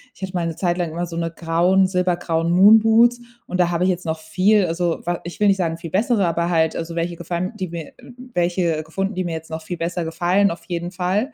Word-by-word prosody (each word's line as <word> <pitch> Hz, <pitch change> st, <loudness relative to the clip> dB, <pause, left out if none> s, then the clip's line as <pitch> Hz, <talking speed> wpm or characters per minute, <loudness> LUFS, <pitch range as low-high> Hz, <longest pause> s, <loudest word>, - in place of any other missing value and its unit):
ich -, -, -21 dB
hatte 185 Hz, 0 st, -4 dB
mal 170 Hz, -2 st, -1 dB
'ne 165 Hz, -, -4 dB
Zeit 175 Hz, 0 st, -1 dB
lang 170 Hz, -3 st, -1 dB
immer 175 Hz, +2 st, -3 dB
so 165 Hz, -1 st, -7 dB
'ne 165 Hz, 0 st, -1 dB
grauen, 175 Hz, +3 st, +2 dB
silbergrauen 175 Hz, -3 st, 0 dB
Moonboots 225 Hz, +5 st, +6 dB, 0.3 s
und 180 Hz, -, -3 dB
da 175 Hz, -, +3 dB
habe 175 Hz, +1 st, 0 dB
ich 185 Hz, -, +3 dB
jetzt 180 Hz, -1 st, -2 dB
noch 160 Hz, 0 st, -2 dB
viel, 185 Hz, +5 st, +2 dB
also, 170 Hz, 0 st, -1 dB
wa 175 Hz, -1 st, -1 dB
ich 175 Hz, -, -8 dB
will 205 Hz, -, +5 dB
nicht 195 Hz, -, +3 dB
sagen, 165 Hz, -3 st, -1 dB
viel 165 Hz, -1 st, -8 dB
bessere, 210 Hz, 0 st, +2 dB
aber 170 Hz, 0 st, 0 dB
halt, 160 Hz, -2 st, +1 dB
also, 165 Hz, 0 st, -5 dB
welche 170 Hz, 0 st, -2 dB
gefallen, 175 Hz, +2 st, -3 dB
die 185 Hz, -, -2 dB
mir 165 Hz, -2 st, -7 dB, 0.4 s
welche 175 Hz, -2 st, 0 dB
gefunden, 195 Hz, +5 st, -3 dB
die 185 Hz, -, -2 dB
mir 170 Hz, -, -3 dB
jetzt 160 Hz, 0 st, -7 dB
noch 160 Hz, 0 st, -4 dB
viel 175 Hz, +2 st, -6 dB
besser 170 Hz, 0 st, -3 dB
gefallen 175 Hz, +4 st, +2 dB
auf 170 Hz, -, -8 dB
jeden 175 Hz, 0 st, -4 dB
Fall. 195 Hz, +8 st, -1 dB
175 Hz, 245 wpm, -21 LUFS, 165-185 Hz, 0.4 s, Moonboots